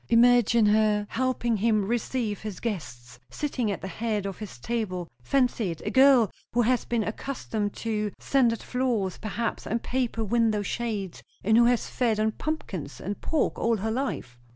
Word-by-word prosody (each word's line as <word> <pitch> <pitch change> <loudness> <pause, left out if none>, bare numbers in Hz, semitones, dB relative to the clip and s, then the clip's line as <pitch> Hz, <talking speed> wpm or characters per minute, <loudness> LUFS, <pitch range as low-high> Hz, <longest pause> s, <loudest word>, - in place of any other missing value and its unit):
Imagine 235 -1 +5
her 210 0 +3
helping 240 -2 0
him 215 -1 +2
receive 230 -1 -1
his 210 -5 -6
guests; 125 - -5
sitting 255 - -2
at 200 - -3
the - - -5
head 215 0 -2
of 195 -2 -5
his 210 - -8
table. 185 - -3
Fancy 245 - +1
it; 165 -2 -5
a 210 - -1
girl 260 -5 +6 0.2
who 240 - +3
has 250 +2 +2
been 235 -2 0
accustomed 215 -2 -3
to 215 -2 -2
sanded 240 -4 +2
floors, 240 -8 -1
perhaps, 225 +2 -3
and 230 +1 -1
paper 245 -3 -1
window 220 -1 +2
shades, 210 -5 -3 0.2
and 220 +3 +4
who 235 +1 +6
has 245 -1 +2
fed 230 -4 0
on 220 0 +2
pumpkins 210 - -4
and 200 +2 -5
pork 315 - 0
all 230 -1 +2
her 220 +3 -2
life." 220 - -3
220 Hz, 170 wpm, -27 LUFS, 205-240 Hz, 0.2 s, girl